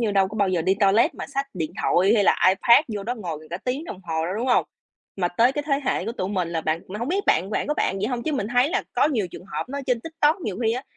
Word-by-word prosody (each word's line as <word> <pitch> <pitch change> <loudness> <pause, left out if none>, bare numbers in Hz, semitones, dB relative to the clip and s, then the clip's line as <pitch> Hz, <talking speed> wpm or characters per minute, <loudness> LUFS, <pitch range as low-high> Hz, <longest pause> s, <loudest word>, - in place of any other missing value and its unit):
như, 225 -3 +1
đâu 195 -1 +3
có 215 - -8
bao 200 -2 +2
giờ 175 -3 0
đi 190 +2 +2
toilet 205 +2 +3
mà - - -6
xách 275 0 -3
điện 160 -3 -3
thoại 195 +5 +3
hay 205 -3 +3
là - - +4
iPad 235 +10 +5
vô 205 -2 -4
đó 240 +4 -3
ngồi 165 -8 -6
cả 175 - -3
tiếng 265 +6 -2
đồng 190 - -8
hồ 160 -2 -2
đâu, 185 - -3
đúng 240 +4 -2
hông? 245 - +3 0.5
Mà 175 -2 0
tới 235 +9 +3
cái 295 - -2
thế 280 -1 +1
hệ - - 0
của 230 - -3
tụi 185 -5 -3
mình 185 -4 -1
là 165 -1 -2
bạn 160 +2 -1
mà 205 +3 -6
hông 235 - -3
biết 390 +4 0
bạn 190 +4 +2
bạn - - -1
có 300 - 0
bạn 195 - 0
vậy 205 - -1
hông? 245 -1 -3
Chứ 315 - -2
mình 265 -8 -1
thấy 245 +3 +3
là - - 0
có - - +3
nhiều 225 -10 0
trường - - -10
hợp 205 - -5
nó 280 +2 -4
trên 250 -3 +1
TikTok, 320 - +1
nhiều 210 - -4
khi 225 - +3
á 250 +3 -3
215 Hz, 310 wpm, -24 LUFS, 185-260 Hz, 0.5 s, iPad